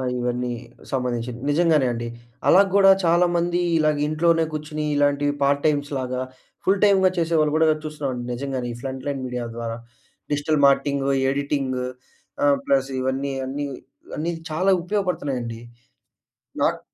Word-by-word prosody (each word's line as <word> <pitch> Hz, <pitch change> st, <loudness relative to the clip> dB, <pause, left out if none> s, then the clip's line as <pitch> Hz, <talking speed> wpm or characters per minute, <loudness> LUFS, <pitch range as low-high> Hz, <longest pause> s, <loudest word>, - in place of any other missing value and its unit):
ఆహ్, 125 Hz, -1 st, -1 dB
ఇవన్నీ 125 Hz, 0 st, -1 dB, 0.4 s
సంబంధించినివి. 125 Hz, -2 st, -2 dB
నిజంగానే 155 Hz, -3 st, +3 dB
అండి. 120 Hz, 0 st, -4 dB, 0.4 s
అలా 190 Hz, -, +7 dB
కూడా 195 Hz, -1 st, +7 dB
చాలామందీ 175 Hz, +1 st, +2 dB, 0.2 s
ఇలాగ 155 Hz, -1 st, +2 dB
ఇంట్లోనే 165 Hz, +1 st, +2 dB
కూర్చొని 155 Hz, 0 st, -4 dB
ఇలాంటి 145 Hz, 0 st, +2 dB, 0.2 s
పార్ట్ 140 Hz, 0 st, +2 dB
టైమ్స్‌లాగా, 140 Hz, -4 st, -1 dB, 0.4 s
ఫుల్ 195 Hz, +1 st, +3 dB
టైమ్‌గా 190 Hz, -2 st, +5 dB
చేసేవాళ్ళు 160 Hz, -3 st, +2 dB
కూడా 160 Hz, 0 st, +4 dB, 0.2 s
చూస్తున్నామండి 140 Hz, -5 st, -4 dB
నిజంగానే 130 Hz, -1 st, -3 dB
ఈ -, -, -7 dB
ఫ్రంట్ 130 Hz, -1 st, -5 dB
లైన్ 140 Hz, -2 st, -2 dB
మీడియా 125 Hz, -1 st, -4 dB
ద్వారా. 115 Hz, -1 st, -4 dB, 0.6 s
డిజిటల్ 145 Hz, +1 st, +1 dB
మార్కెటింగు, 140 Hz, 0 st, +2 dB, 0.2 s
ఎడిటింగు 135 Hz, -2 st, -1 dB, 0.6 s
ఆహ్, 140 Hz, -1 st, +5 dB
ప్లస్ 135 Hz, 0 st, +2 dB
ఇవన్నీ 135 Hz, +2 st, -1 dB
అన్నీ, 140 Hz, +2 st, -3 dB, 0.5 s
అన్నీ 165 Hz, +3 st, -1 dB, 0.2 s
చాలా 185 Hz, +5 st, +2 dB
ఉపయోగపడుతున్నాయండి. 145 Hz, -, -2 dB, 1.0 s
నాక్ -, -, +1 dB
145 Hz, 130 wpm, -23 LUFS, 130-160 Hz, 1.0 s, అలా